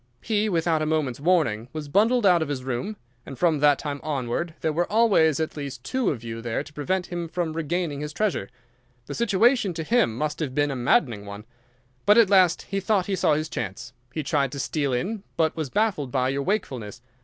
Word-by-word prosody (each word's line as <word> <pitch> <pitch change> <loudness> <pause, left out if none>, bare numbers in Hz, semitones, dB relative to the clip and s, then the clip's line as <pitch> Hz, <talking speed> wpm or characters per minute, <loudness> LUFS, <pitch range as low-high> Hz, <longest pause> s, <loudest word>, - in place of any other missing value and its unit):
He, 215 -1 +1
without 165 -3 +1
a 155 - 0
moment's 150 -6 -1
warning, 145 -10 +1
was 155 -2 -5
bundled 220 - +3
out 180 -3 +5
of 160 - -1
his 140 -3 -4
room, 130 - -3 0.3
and 135 - -9
from 160 0 +2
that 145 -1 +5
time 145 -2 -4
onward 150 +3 -3
there 155 - 0
were 175 +4 -1
always 200 -10 +4
at 160 - -2
least 140 -4 -6
two 260 - 0
of 120 -6 -3
you 115 0 -6
there 120 +3 -2
to 145 - -15
prevent 180 +5 -1
him 175 -1 -3
from 165 -1 -2
regaining 165 -2 -2
his 150 0 -4
treasure. 210 +5 -1 0.6
The - - -6
situation 230 -2 +2
to 160 - -3
him 215 - +2
must 150 +2 -2
have 140 -5 -3
been 145 -1 +2
a - - -3
maddening 120 -4 +1
one. 100 +2 -8 0.6
But 210 +2 +7
at 220 -4 +5
last 185 -4 +4
he 195 - -3
thought 195 -1 +1
he 195 - -1
saw 155 -4 +2
his 155 +1 -2
chance. 120 - -5 0.2
He 155 +3 -3
tried 140 -1 0
to 140 - -5
steal 140 0 -1
in, 190 - -2 0.2
but 160 -1 +2
was 155 -4 -3
baffled 190 - 0
by 130 -1 +1
your 135 +1 -1
wakefulness. 125 - -3
155 Hz, 215 wpm, -25 LUFS, 135-185 Hz, 0.6 s, But